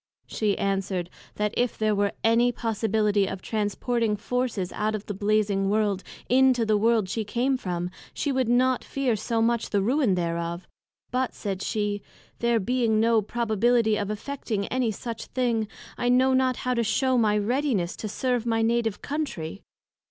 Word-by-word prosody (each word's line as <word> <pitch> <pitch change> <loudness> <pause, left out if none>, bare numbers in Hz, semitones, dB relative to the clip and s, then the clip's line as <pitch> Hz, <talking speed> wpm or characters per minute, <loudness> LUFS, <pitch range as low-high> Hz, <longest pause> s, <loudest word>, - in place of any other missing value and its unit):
she 210 -3 -1
answered, 195 -3 -1 0.2
That 210 +1 -1
if 245 -1 0
there 215 -1 +2
were 200 0 +1
any 230 +2 +4
possibility 215 -3 +1
of 190 - -4
transporting 220 +2 -1
Forces 230 -4 -2
out 215 +1 -1
of 210 - -6
the 205 - -4
Blazing 205 -1 +1
World, 205 -2 +1 0.3
into 255 -2 +4
the 215 -1 +2
World 220 -1 +3
she 220 +4 -2
came 245 +6 0
from, 180 -6 -3 0.2
she 285 - -2
would 260 -3 0
not 255 +1 +3
fear 265 -4 0
so 225 +1 0
much 235 0 +1
the 205 - +1
ruin 235 0 +2
thereof: 170 0 -2 0.5
but, 255 +1 -1
said 195 -3 -4
she, 205 -2 -1 0.4
there 235 -1 +2
being 230 0 +1
no 225 0 +4
probability 230 +1 +2
of 205 -1 -2
effecting 215 -1 -3
anysuch 230 -2 -2
thing, 235 -4 +1 0.3
I 245 - +1
know 260 +1 +4
not 260 -1 +2
how 250 - +2
to 235 -1 +1
shew 260 +4 +1
my 210 -2 +3
readiness 220 -4 0
to 215 - -5
serve 250 +1 0
my 225 -1 +1
Native 225 -2 0
Country. 270 - -4
220 Hz, 165 wpm, -26 LUFS, 205-245 Hz, 0.5 s, any